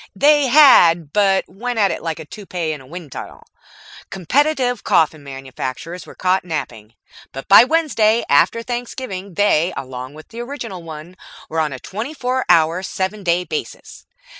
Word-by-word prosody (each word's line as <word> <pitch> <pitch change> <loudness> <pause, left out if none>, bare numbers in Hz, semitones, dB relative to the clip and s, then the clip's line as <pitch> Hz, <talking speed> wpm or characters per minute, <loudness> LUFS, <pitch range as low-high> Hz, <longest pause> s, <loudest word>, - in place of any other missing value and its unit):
They 290 +5 +4
had, 175 - +6
but 195 -2 +2
it - - -28
went 245 +4 -5 0.2
like 165 -2 -4
a 160 - -9
toupee 180 -3 -5
in 150 - -9
a 130 - -16
wind 165 -1 -10
tunnel. - - -9 0.6
Competitive 250 - 0
coffin 155 -2 +1
manufacturers 135 +5 -7
were - - -12
caught 185 +1 +1
napping, 125 -10 -6 0.4
but 135 - -8
by 200 - +9
Wednesday 250 -8 +2
after 230 +11 +3
Thanksgiving 235 -6 -6
they, 185 -3 +2
along 130 +1 -7
with 155 - -13
the 230 +1 -7
original 240 -8 -7
one, 165 +2 -10 0.3
were 160 - -2
on 155 -2 0
a 130 - -6
twenty 220 - -6
four 255 -1 -2
hour, 165 +2 +4
seven 190 +2 -4
day 175 0 +1
basis. 155 -3 -7
185 Hz, 160 wpm, -19 LUFS, 155-235 Hz, 0.6 s, by